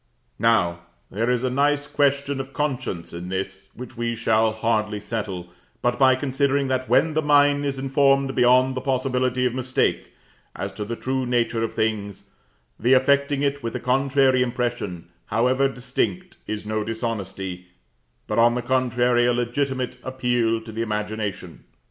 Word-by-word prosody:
Now, 105 -7 +2 0.3
there 115 +4 -1
is 125 0 +1
a 130 - 0
nice 145 +2 +2
question 140 -1 0
of 135 0 -6
conscience 130 - -3
in 85 +1 -6
this, 95 +1 -5
which 125 +1 -9
we 115 0 -2
shall 110 -1 +2
hardly 110 -1 -1
settle 100 -5 -5 0.3
but 120 +2 +1
by 130 -1 +6
considering 140 +1 0
that, 130 0 -1
when 160 -1 +3
the 155 - +1
mind 145 -1 +3
is 135 -1 -2
informed 135 0 +2
beyond 130 +1 +4
the 130 - -4
possibility 130 -1 0
of 125 - +1
mistake 130 0 -1 0.4
as - - -5
to 105 - -5
the 115 +3 -4
true 130 +1 -2
nature 120 -2 0
of 115 - -3
things, 105 -2 -2 0.5
the 120 +4 +3
affecting 140 +2 +3
it 140 0 0
with 115 0 -4
a - - -2
contrary 130 0 +2
impression, 120 -8 -2 0.2
however 130 +4 +2
distinct, 135 +8 -3
is 105 0 -4
no 110 0 -1
dishonesty, 100 -5 -4 0.6
but - - -1
on 120 +1 +5
the 125 - -2
contrary, 120 -1 +2
a 125 - +3
legitimate 130 +2 -2
appeal 120 -3 0
to 110 0 -10
the 110 +1 -4
imagination. 105 -4 -4
125 Hz, 160 wpm, -23 LUFS, 110-135 Hz, 0.6 s, by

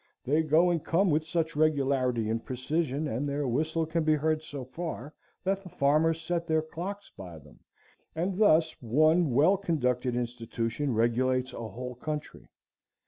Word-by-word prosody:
They 150 +5 +3
go 160 +3 +4
and 165 -3 -1
come 180 +2 +2
with 155 +1 +1
such 165 -1 -1
regularity 135 -6 +1
and 115 +1 -2
precision, 145 +3 -2
and 140 +3 -2
their 140 0 -1
whistle 160 +6 0
can 160 +1 -1
be 155 0 +3
heard 155 +1 0
so 145 -4 -7
far, 150 0 -6 0.3
that 195 +1 0
the 185 - -11
farmers 155 +3 +2
set 170 +1 -2
their 160 -1 +2
clocks 190 +6 -6
by 90 -4 -9
them, 75 -1 -17 0.6
and 180 +4 -2
thus 160 -6 +4
one 155 +7 +3
well 150 +10 +4
conducted 125 -9 0
institution 120 +2 -2
regulates 130 +3 +1
a 115 - -5
whole 125 +4 -6
country. 150 +4 -6
150 Hz, 160 wpm, -29 LUFS, 125-165 Hz, 0.6 s, go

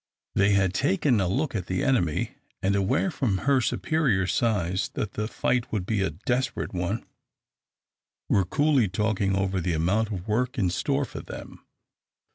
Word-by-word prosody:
They 100 +1 +3
had 95 -2 +2
taken 110 +5 +2
a 90 - +1
look 135 - 0
at 95 -5 -3
the 90 -1 -1
enemy, 90 - +1 0.3
and 100 +1 +2
aware 100 - +1
from 115 - 0
her 140 -2 +4
superior 125 -8 +1
size 95 -3 0
that 105 - -2
the 105 0 -2
fight 120 +1 -1
would 100 -5 -1
be 105 0 0
a 95 - +1
desperate 120 - -2
one, 90 +5 -2 1.2
were 100 - +3
coolly 140 - +2
talking 100 0 0
over 95 -1 0
the 90 0 0
amount 95 +8 +1
of 95 -3 -5
work 125 +5 0
in 95 -6 +1
store 140 +8 0
for - - -8
them. - - -10
100 Hz, 165 wpm, -26 LUFS, 95-125 Hz, 1.2 s, her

